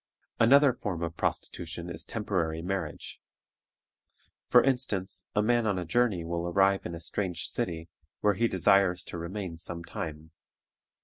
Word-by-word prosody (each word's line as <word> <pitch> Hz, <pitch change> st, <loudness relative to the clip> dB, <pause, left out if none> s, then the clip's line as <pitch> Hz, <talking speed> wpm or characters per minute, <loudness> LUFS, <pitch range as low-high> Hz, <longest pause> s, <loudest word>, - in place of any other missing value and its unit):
Another 140 Hz, +3 st, +6 dB
form 90 Hz, -8 st, -4 dB
of 85 Hz, 0 st, -3 dB
prostitution 85 Hz, 0 st, -3 dB
is 80 Hz, -2 st, -4 dB
temporary 85 Hz, -6 st, -2 dB
marriage. 95 Hz, +2 st, -4 dB, 1.3 s
For 125 Hz, -, +6 dB
instance, 125 Hz, -8 st, -1 dB
a 105 Hz, -, +3 dB
man 120 Hz, 0 st, +2 dB
on 100 Hz, -3 st, +1 dB
a 90 Hz, -, -3 dB
journey 105 Hz, -3 st, +1 dB
will 85 Hz, +1 st, -2 dB
arrive 95 Hz, +2 st, +3 dB
in 85 Hz, -, -6 dB
a -, -, -7 dB
strange 90 Hz, +1 st, -3 dB
city, 80 Hz, -1 st, -3 dB, 0.3 s
where 105 Hz, -1 st, +4 dB
he 115 Hz, +4 st, +2 dB
desires 95 Hz, -2 st, +3 dB
to 85 Hz, -, -7 dB
remain 85 Hz, -1 st, -5 dB
some 85 Hz, 0 st, -5 dB
time. 80 Hz, -1 st, -6 dB
90 Hz, 145 wpm, -29 LUFS, 85-105 Hz, 1.3 s, Another